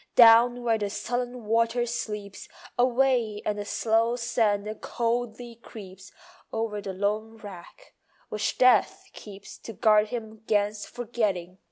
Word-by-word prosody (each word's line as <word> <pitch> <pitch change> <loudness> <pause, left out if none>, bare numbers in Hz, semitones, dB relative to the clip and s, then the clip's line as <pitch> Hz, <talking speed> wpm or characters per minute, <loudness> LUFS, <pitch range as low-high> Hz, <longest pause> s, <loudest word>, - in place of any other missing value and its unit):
Down 240 +1 +7
where 225 -2 +1
the 205 -1 -2
sullen 245 +2 -4
water 230 +2 +1
sleeps 210 -4 -5 0.3
Alway 245 -3 +2
and 210 -1 -1
the 205 - -4
slow 225 +3 +1
sand 225 -4 0
coldly 235 0 -3
creeps 195 -4 -12 0.4
Over 225 -2 -3
the 200 -1 -5
lone 210 +4 -2
wreck, 205 - -12 0.4
which 210 -1 -2
Death 255 0 +4
keeps 200 -2 -11
To 225 - -9
guard 215 -1 +4
him 220 -1 -7
'gainst 205 0 0
forgetting. 210 -7 -3
225 Hz, 130 wpm, -26 LUFS, 205-240 Hz, 0.4 s, Down